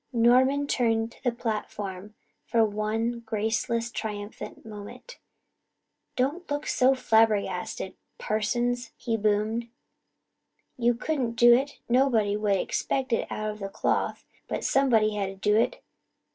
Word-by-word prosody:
Norman 255 +4 +4
turned 225 -4 +1
to - - -20
the 245 - +2
platform 210 -3 -5 0.3
for 225 -1 +3
one 220 +3 -1
graceless, 230 +1 -1
triumphant 210 -1 -6
moment. 210 - -10 1.0
"Don't 295 +8 -1
look 290 +1 -2
so 260 +1 +3
flabbergasted, 210 -6 +1 0.2
parsons," 240 +3 -1
he 230 -2 -1
boomed. 215 +2 0 1.1
"You 240 -1 +2
couldn't 250 -2 -1
do 240 0 +7
it 270 +4 +1
nobody 235 -5 +3
would 210 -1 +1
expect 260 +6 -1
it - - -1
of 215 0 -3
the 195 -1 -4
cloth - - -1 0.2
but - - -3
somebody 230 -6 +3
had 200 -2 -1
to 195 - -8
do 210 +2 +1
it. 225 - +1
225 Hz, 125 wpm, -27 LUFS, 210-245 Hz, 1.1 s, do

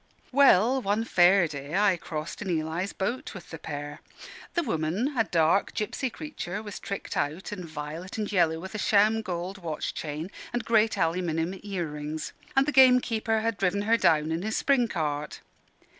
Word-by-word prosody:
Well, 260 -2 +5
one 210 +1 0
Fair 180 -3 +5
day 145 +1 -6
I 200 -2 +4
crossed 155 -2 -6
in 200 - -4
Eli's 165 +3 -1
boat 235 +5 -3
with 180 - -10
the 160 - -7
pair. 145 -1 -6 0.5
The 345 - +2
woman 210 - -1
a 225 -3 +2
dark 170 +2 +2
gipsy 235 +5 -2
creature 215 -8 -6
was 205 -2 -7
tricked 200 - -5
out 155 +8 -2
in 180 -4 -6
violet 155 +5 -6
and 215 -1 -2
yellow, 165 -4 +2
with 190 +4 -8
a 215 - -4
sham 215 +2 +3
gold 185 -1 -4
watch 160 -4 -4
chain 155 +4 -5 0.2
and 240 -1 -2
great 225 -1 +3
aluminium 165 +1 -1
earrings: 155 -6 -4 0.2
and 270 0 +5
the 300 - 0
gamekeeper 245 -4 +4
had 225 -1 -1
driven 195 +2 +1
her 225 +2 +4
down 160 -7 +3
in 165 +1 -1
his 220 +3 -2
spring 265 -4 +3
cart. 150 -5 -3
190 Hz, 175 wpm, -27 LUFS, 160-220 Hz, 0.5 s, Well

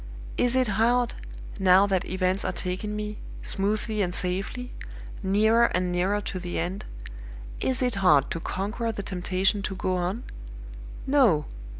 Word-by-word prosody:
Is 245 +1 +2
it 255 -1 +3
hard, 235 +4 +2 0.5
now 190 +1 +6
that 195 -2 0
events 185 +1 0
are - - 0
taking 190 +3 -3
me, 210 0 -4 0.2
smoothly 215 +2 0
and 180 -2 0
safely, 195 +8 -2 0.5
nearer 215 +4 +4
and 180 0 0
nearer 190 +4 +1
to 190 -2 -4
the 175 -1 -4
End 180 +4 -3 0.7
is 260 0 0
it 250 -1 +1
hard 150 -7 +5
to 165 - -2
conquer 210 +7 -2
the 205 -2 -5
temptation 190 +2 0
to 195 0 -3
go 185 0 -1
on? 180 +7 -2 0.8
No! 240 - +4
195 Hz, 145 wpm, -26 LUFS, 185-220 Hz, 0.8 s, now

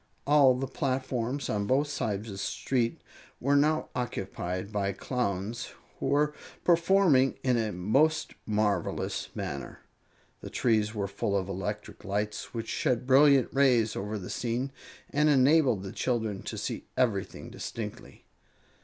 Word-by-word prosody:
All 140 -2 +6
the 130 +2 -2
platforms 130 -1 -2
on 100 -1 -1
both 140 +6 +2
sides 110 -7 -2
of - - -6
the 95 - -7
street 115 +3 -1 0.4
were 140 +3 +2
now 155 +2 +2
occupied 95 -5 -4
by 100 -2 -1
Clowns, 115 +1 -3 0.3
who - - -2
were 150 +1 +2 0.3
performing 170 -6 +4
in 125 -2 +3
a 110 -2 0
most 135 - +1
marvelous 105 -1 -1
manner. 70 0 -5 0.6
The - - -8
trees 110 -2 +1
were 100 -2 -1
full 100 +1 -1
of 95 -1 -2
electric 105 +2 -5
lights, 105 +1 -3
which 115 -1 -5
shed 125 +2 0
brilliant 135 -1 +6
rays 125 -6 +3
over 105 +2 -3
the 95 - -7
scene 125 +3 -2 0.4
and 150 +2 +3
enabled 135 -6 +4
the 95 - -6
children 110 -6 -1
to - - -5
see - - -4
everything 115 -7 -1
distinctly. 105 -3 -7
120 Hz, 140 wpm, -29 LUFS, 105-135 Hz, 0.6 s, All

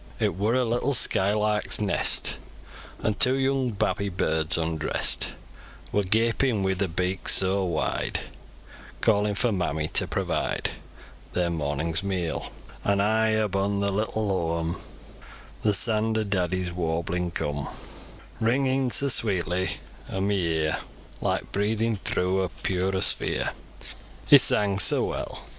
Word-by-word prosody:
It - - +1
wor 105 +7 0
a 130 -1 +2
little 120 +4 +1
skylark's 105 -2 +1
nest, 105 -2 +2 0.7
An' 110 - +1
two 130 +5 +6
young 135 -1 0
babby 100 -2 -1
burds, 80 -3 0
undrest, 80 -1 0 0.6
Wor 105 - +1
gapin 115 +2 +1
wi' 95 0 +1
ther 95 +1 -1
beaks 90 +2 0
soa 95 +1 +1
wide, 85 - -1 0.8
Callin' 105 -2 +2
for 120 +3 +1
mammy 80 -5 -1
to - - +5
provide - - -2 0.6
Ther 90 -1 0
mornin's 80 +1 -1
meal; 95 -4 -3 0.3
An' 100 0 +1
high 110 +2 +2
aboon 100 0 -1
ther 100 0 0
little 110 +2 -1
hooam, 85 -3 -2 0.8
Th' 105 -2 +3
saand 110 +1 +3
o' 110 - +1
daddy's 95 -3 -1
warblin 85 +1 -2
coom, 75 -3 -3 0.7
Ringin' 130 +3 +1
soa 140 +3 +4
sweetly 95 -4 0 0.3
o' 95 - -3
mi 100 0 0
ear, 80 -2 0 0.4
Like - - -2
breathins 110 +1 -1
thro' 90 +1 0
a 95 -1 -1
purer 95 0 -2
sphere, - - +1 0.7
He - - +8
sang 100 -1 +3
soa - - +3
weel. - - -5
100 Hz, 130 wpm, -25 LUFS, 90-110 Hz, 0.8 s, He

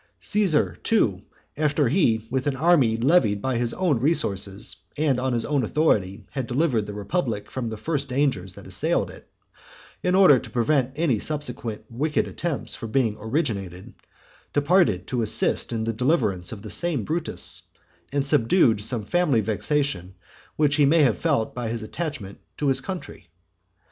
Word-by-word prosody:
Caesar, 195 -8 +2
too, 110 - +1 0.3
after 150 -1 +1
he, 115 - +2
with 130 +1 -1
an 140 - 0
army 140 -7 +3
levied 120 -5 +3
by 130 +4 -1
his 120 0 0
own 170 -10 +1
resources 100 - 0 0.2
and 145 -4 +1
on 130 +1 -1
his 120 -2 -1
own 145 -2 +1
authority, 105 -7 0
had 130 -3 -3
delivered 125 -5 0
the 105 - -6
republic 105 - -2
from 125 -3 -3
the 110 - -6
first 140 +4 -3
dangers 125 -9 -1
that - - -12
assailed - - -1
it, - - -15 0.7
in 180 0 +1
order 180 -9 +7
to - - -10
prevent 130 +1 +1
any 145 -8 +1
subsequent 125 -7 -4
wicked 150 +6 -1
attempts 165 -4 -3
from 115 - -6
being 115 -3 +1
originated, 105 - -3 0.6
departed 145 - +3
to 125 -2 -2
assist 110 +2 +1
in 115 -1 -2
the 115 0 -1
deliverance 110 - 0
of 105 -2 -8
the 105 - -7
same 170 -9 0
Brutus, 165 +7 -3 0.5
and 140 0 0
subdued 115 - +3
some 110 0 -2
family 165 - +2
vexation 110 -3 -1 0.4
which 145 -1 +2
he 145 - +5
may 160 +2 +5
have 115 -9 +2
felt 110 - 0
by 120 -2 -4
his 115 -1 -3
attachment 120 - -5 0.2
to 145 - +1
his 135 0 +2
country. 185 +2 -7
130 Hz, 165 wpm, -24 LUFS, 110-150 Hz, 0.7 s, order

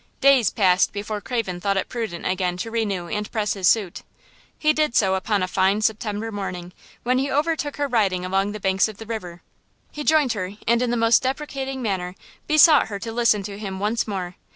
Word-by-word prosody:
Days 270 -6 +5
passed 185 -3 +2
before 205 +1 -4
Craven 205 -8 -3
thought 200 0 0
it 195 - -1
prudent 220 -8 -5
again 180 -1 -1
to 225 +5 -5
renew 205 -6 -2
and 210 +4 -4
press 215 -3 -1
his 190 -3 0
suit. 195 -3 +1 0.6
He 305 0 +2
did 305 -6 0
so 190 -3 +3
upon 195 +1 0
a - - -1
fine 195 +3 +1
September 215 0 -1
morning, 180 -3 -6 0.3
when 255 +1 +1
he 275 +1 -1
overtook 300 0 -1
her 290 0 0
riding 195 -8 +1
along 195 +2 0
the 215 - -6
banks 190 0 +2
of 215 -2 -9
the 225 - -9
river. 180 -6 -6 0.5
He 300 - -6
joined 295 -5 +3
her 185 -2 -4
and 235 +1 +3
in 250 - 0
the 240 - 0
most 230 0 +4
deprecating 270 -1 -3
manner, 185 -4 -2 0.3
besought 305 -1 +6
her 205 -2 -5
to 225 +3 -6
listen 225 -3 +2
to 200 0 -7
him 195 -3 -5
once 220 +4 -1
more. 185 -3 -5
210 Hz, 205 wpm, -23 LUFS, 190-240 Hz, 0.6 s, besought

